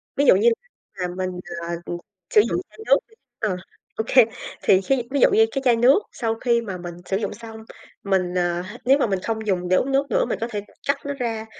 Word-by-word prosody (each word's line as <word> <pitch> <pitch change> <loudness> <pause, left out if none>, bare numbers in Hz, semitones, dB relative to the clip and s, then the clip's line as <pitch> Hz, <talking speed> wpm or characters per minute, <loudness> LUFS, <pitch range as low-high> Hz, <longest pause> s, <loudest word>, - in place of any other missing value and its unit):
Ví 285 - +2
dụ - - +7
như 225 +5 +5 0.5
mà 180 - 0
mình, 185 0 -1 0.3
à, 170 0 -3
ờ, - - -4 0.4
sử 210 - +6
dụng 360 - -1
chai - - -20
nước - - +6
đi - - -24 0.3
ờ, 205 -4 0 0.4
ô 220 - -1
kê, 255 -3 +7 0.4
thì 190 0 +5
khi 255 +3 +1
ví 285 - +1
dụ - - +6
như 225 +1 +5
cái 270 - -2
chai 240 -2 +5
nước 250 - +5
sau 225 -2 -2
khi 235 0 +1
mà 195 -5 -5
mình 175 -1 -7
sử 195 - 0
dụng 215 - -3
xong 225 +1 -10 0.5
mình, 185 -2 0
à 175 0 0
h 210 +5 -9
nếu 270 +2 +6
mà 270 - +1
mình 195 -2 0
không 220 -1 -3
dùng 180 -2 0
để 185 - +4
uống 270 +8 +1
nước 275 +1 +2
nữa - - +2
mình - - -3
có 230 - -1
thể 205 -1 -3 0.3
cắt 280 0 +2
nó 285 - -2
ra, 230 -4 -3
220 Hz, 250 wpm, -23 LUFS, 185-250 Hz, 0.5 s, dụ